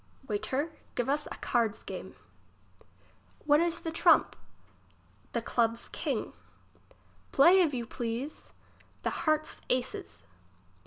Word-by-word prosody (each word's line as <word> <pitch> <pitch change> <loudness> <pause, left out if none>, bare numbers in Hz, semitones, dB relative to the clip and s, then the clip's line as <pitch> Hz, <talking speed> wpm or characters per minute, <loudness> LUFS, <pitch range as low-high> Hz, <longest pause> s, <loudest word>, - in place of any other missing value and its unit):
Waiter, 260 +9 -1 0.2
give 245 - 0
us 295 +2 +1
a - - -6
card's 230 -3 0
game. - - -7 1.3
What 295 0 +5
is 340 0 0
the 330 -1 -3
trump? 325 - +4 1.0
The - - -1
club's 230 -1 0
king. - - -2 1.0
Play, 350 +7 +7
if 330 -4 +3
you 240 -2 -2
please. 240 +5 -5 0.5
The - - 0
heart's 310 -1 0
aces. 245 - -2
270 Hz, 110 wpm, -30 LUFS, 230-310 Hz, 1.3 s, Play